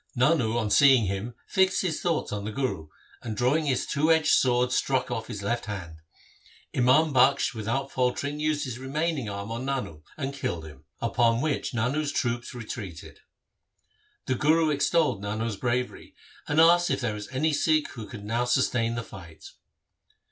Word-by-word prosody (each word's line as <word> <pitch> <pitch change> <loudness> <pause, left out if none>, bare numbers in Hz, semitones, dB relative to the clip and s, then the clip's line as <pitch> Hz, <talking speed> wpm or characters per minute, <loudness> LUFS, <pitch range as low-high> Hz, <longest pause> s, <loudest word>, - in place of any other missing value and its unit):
Nano 125 -3 +2
on 110 -3 -1
seeing 135 -4 +6
him 100 +5 -4
fixed 190 0 +2
his 165 -5 -2
thoughts 170 -3 -1
on 105 -1 -3
the 105 - -4
Guru, 105 - -3 0.3
and 110 -2 -5
drawing 145 +6 +1
his 130 -3 0
two 155 +3 +1
edged 160 -1 +4
sword 125 -1 +3
struck 130 0 0
off 110 0 -3
his 105 -4 -6
left 115 +1 -2
hand. 90 -6 -6 0.8
Imam 135 +5 +4
Bakhsh 130 0 +4
without 120 +5 -3
faltering 135 +3 -1
used 155 -1 0
his 125 -2 -6
remaining 140 -2 -2
arm 100 +2 -5
on 115 +2 -4
Nano 130 - -4
and 140 -2 -3
killed 85 -12 -4
him, 75 -1 -13 0.2
upon 115 0 +2
which 145 -2 -2
Nano's 140 +6 0
troops 120 0 -2
retreated. 105 - -8 1.1
The 130 - 0
Guru 155 +4 +3
extolled 145 -5 +1
Nano's 110 +2 -3
bravery, 125 +4 -3 0.3
and 150 - +1
asked 175 +2 +6
if - - 0
there 120 -3 -1
was 105 -1 -7
any 150 +5 0
Sikh 155 +1 +2
who 110 -3 -8
could 105 -2 -9
now 115 +3 0
sustain 120 -2 +1
the 115 - -3
fight. 85 -8 -12
125 Hz, 170 wpm, -26 LUFS, 110-145 Hz, 1.1 s, seeing